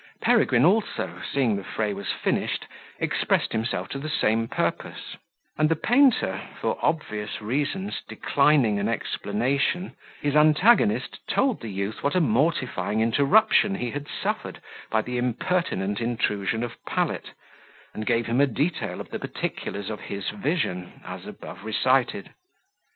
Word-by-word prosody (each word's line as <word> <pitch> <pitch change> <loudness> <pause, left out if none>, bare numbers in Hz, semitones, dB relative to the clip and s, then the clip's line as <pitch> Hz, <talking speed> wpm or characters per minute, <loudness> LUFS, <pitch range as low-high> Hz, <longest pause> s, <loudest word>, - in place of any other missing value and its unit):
Peregrine 125 +2 +4
also, 210 +5 +1
seeing 125 -6 +2
the 100 - -5
fray 105 +2 -2
was 100 +1 -3
finished, - - -1 0.3
expressed - - 0
himself 110 +2 -2
to 140 - -4
the 155 +3 -5
same 115 -6 +1
purpose; - - -3 0.4
and 155 0 +4
the 165 - +3
painter, 250 - +3 0.2
for - - -1
obvious 105 -10 -1
reasons, 145 - -2
declining 140 -8 +3
an 100 +2 0
explanation, 130 - -1 0.2
his 145 0 -1
antagonist 200 +9 +4
told 265 -4 +1
the 115 - -5
youth 100 +2 -3
what 140 - 0
a - - +5
mortifying 125 - +1
interruption 175 - +4
he 125 -10 -3
had 145 0 -5
suffered - - -3 0.3
by 110 0 +1
the 125 0 -3
impertinent 120 - -1
intrusion 110 -2 0
of 120 - -7
Pallet, - - -2 0.6
and 110 - -5
gave 115 -1 +2
him 120 +4 +2
a 145 - +5
detail 150 +7 -2
of - - -11
the - - -3
particulars 100 +1 -4
of 105 - -5
his 100 -1 -4
vision, 105 - -2
as - - -7
above 100 - -9
recited. 130 - +1
125 Hz, 140 wpm, -25 LUFS, 110-155 Hz, 0.6 s, a